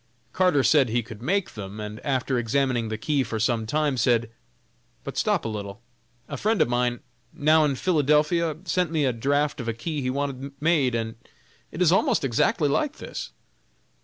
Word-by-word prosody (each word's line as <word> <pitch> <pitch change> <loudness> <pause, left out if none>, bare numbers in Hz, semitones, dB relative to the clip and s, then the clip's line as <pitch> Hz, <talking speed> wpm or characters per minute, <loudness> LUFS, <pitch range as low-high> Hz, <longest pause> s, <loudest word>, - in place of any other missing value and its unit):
Carter 180 -7 +3
said 140 -5 +4
he 120 +1 0
could 115 -1 -11
make 190 +8 -1
them, 105 0 -7
and 105 +1 -6
after 130 -2 0
examining 120 0 0
the 110 - -3
key 140 +5 0
for 110 -3 -3
some 115 -1 0
time, 150 +1 0
said: 120 -1 +2 0.7
"But - - -6
stop - - +1
a - - 0
little; 100 -2 -6 0.5
a 145 - -5
friend 215 - +1
of - - +4
mine, 120 0 0 0.3
now 155 +2 +3
in 140 -2 0
Philadelphia, 155 +1 +2
sent 180 0 0
me 155 -3 +1
a 130 - +1
draft 145 +4 0
of 120 - -7
a 115 - 0
key 145 +6 -4
he 130 - -1
wanted 140 0 -3
made, 150 -6 +2
and 115 0 -3 0.5
it 175 - 0
is 165 - +4
almost 230 - +2
exactly 140 - +2
like 300 - 0
this!" - - -7
135 Hz, 185 wpm, -25 LUFS, 115-155 Hz, 0.7 s, said